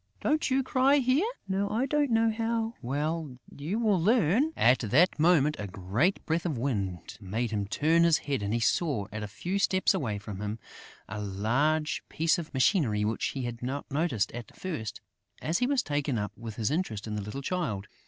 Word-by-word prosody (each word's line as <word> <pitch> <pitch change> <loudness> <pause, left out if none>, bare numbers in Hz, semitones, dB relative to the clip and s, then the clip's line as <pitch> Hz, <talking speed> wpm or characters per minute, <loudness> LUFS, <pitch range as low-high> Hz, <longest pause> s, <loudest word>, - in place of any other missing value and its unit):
Don't 305 0 +1
you 265 +1 +2
cry 260 +2 +3
here?" 275 - +3 0.2
"No, 195 +1 0
I 230 +5 +1
don't 290 +1 +1
know 225 -1 +3
how...." 225 0 -1
"Well, 145 +2 -2 0.2
you 155 +9 -3
will 210 -6 +2
learn...." 225 - +3
At 125 +2 +5
that 145 - +3
moment, 155 -2 +4
a 105 - -4
great 105 - 0
breath 165 +1 0
of 150 -7 -2
wind 100 -9 -3
made 110 +5 -2
him 100 -2 -1
turn 160 +10 +3
his 165 -2 +5
head 140 -5 -2
and 100 0 -2
he 115 - +1
saw, 120 - +1
at 110 - -5
a 105 - -4
few 180 - -3
steps 190 0 +3
away 125 - -1
from 100 -1 -7
him, 105 +1 -3 0.5
a 105 - -5
large 120 +11 0
piece 165 +2 +1
of 160 - -7
machinery 130 - +2
which 110 +1 -1
he 135 - -3
had 120 -1 -5
not 135 +4 -4
noticed 135 - 0
at 120 -1 -9
first, 135 - -5 0.4
as 165 +3 0
he 250 - +2
was 275 -2 +2
taken 145 -3 -1
up 105 -1 -2
with 115 -2 -8
his 115 +3 -1
interest 130 - -2
in 105 -1 -4
the 105 - -2
little 105 +8 -6
Child. 135 - -2
145 Hz, 200 wpm, -29 LUFS, -, 0.5 s, At